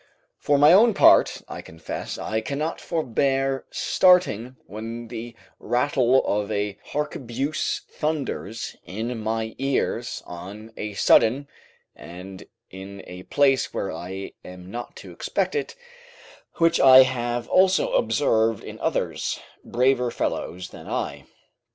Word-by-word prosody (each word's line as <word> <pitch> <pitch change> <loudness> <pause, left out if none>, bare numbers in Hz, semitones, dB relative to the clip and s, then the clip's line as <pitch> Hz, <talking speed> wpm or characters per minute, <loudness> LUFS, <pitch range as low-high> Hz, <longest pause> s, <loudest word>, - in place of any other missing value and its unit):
For 145 - +2
my 145 +4 +7
own 220 +2 +6
part, - - +5
I - - -7
confess 80 0 -7
I 110 0 -2
cannot 145 +7 -3
forbear 135 -3 0
starting 155 - +3
when 115 +3 -7
the 115 0 -7 0.2
rattle 125 +1 +2
of 105 0 -1
a 100 0 -2
harquebuse 140 -1 -2
thunders 145 -8 -4
in 115 +6 -4
my 110 +1 -2
ears 130 -3 -1
on 100 +6 -9
a 105 -1 -5
sudden, 130 +8 +4 0.5
and 90 +5 -10 0.3
in 95 +1 -9
a 90 0 -9
place 135 -3 +2
where 95 - -2
I 95 +2 -7
am 90 0 -11
not 120 +2 -7
to - - -11
expect - - -2
it, 440 - -3 0.8
which 165 0 +3
I 130 -1 +9
have 120 -2 -2
also 190 - +3
observed 115 - +2
in - - -9
others, - - -2 0.2
braver 125 0 +1
fellows 90 -5 -3
than - - -12
I. - - -4
120 Hz, 125 wpm, -24 LUFS, 105-140 Hz, 0.8 s, I